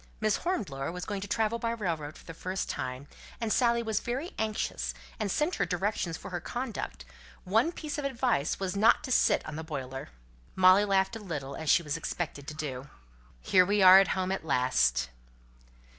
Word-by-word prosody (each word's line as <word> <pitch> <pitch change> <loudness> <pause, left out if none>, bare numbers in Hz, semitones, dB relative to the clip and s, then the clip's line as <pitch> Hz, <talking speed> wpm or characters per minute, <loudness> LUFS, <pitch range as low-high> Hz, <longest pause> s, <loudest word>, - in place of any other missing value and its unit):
Miss 215 -1 +2
Hornblower 165 - -2
was 180 +1 -6
going 205 -2 -4
to 205 - -5
travel 220 +2 0
by 230 - -1
railroad 170 -10 -3
for - - -16
the 165 - -8
first 185 +3 -3
time; 130 +2 -4 0.3
and 225 -2 0
Dorothy 235 -2 +3
was 220 -2 0
very 265 +9 -4
anxious, 215 -1 -2 0.2
and 210 -2 -1
sent 300 - 0
her - - +1
directions 180 -2 -1
for - - -9
her 175 - -2
conduct; 215 - -5 0.4
one 225 - +2
piece 305 -3 -5
of 290 - -3
advice 245 - 0
was 190 0 -2
not 210 +3 +4
to 255 - -5
sit - - +3
on 150 - -6
the 160 - -4
boiler." 135 - -6 0.5
Molly 185 +2 +6
laughed 195 +1 +1
a - - -5
little, 145 -9 -5
as 160 -2 -4
she 170 - +5
was 150 0 -2
expected 155 -4 -4
to 150 - -6
do. 140 -3 -5 0.5
"Here 185 - +5
we 200 +1 +2
are 185 +1 +10
at 195 - +4
home, 185 0 -1
at 195 - -2
last." 65 - +2
190 Hz, 195 wpm, -29 LUFS, 155-220 Hz, 0.5 s, are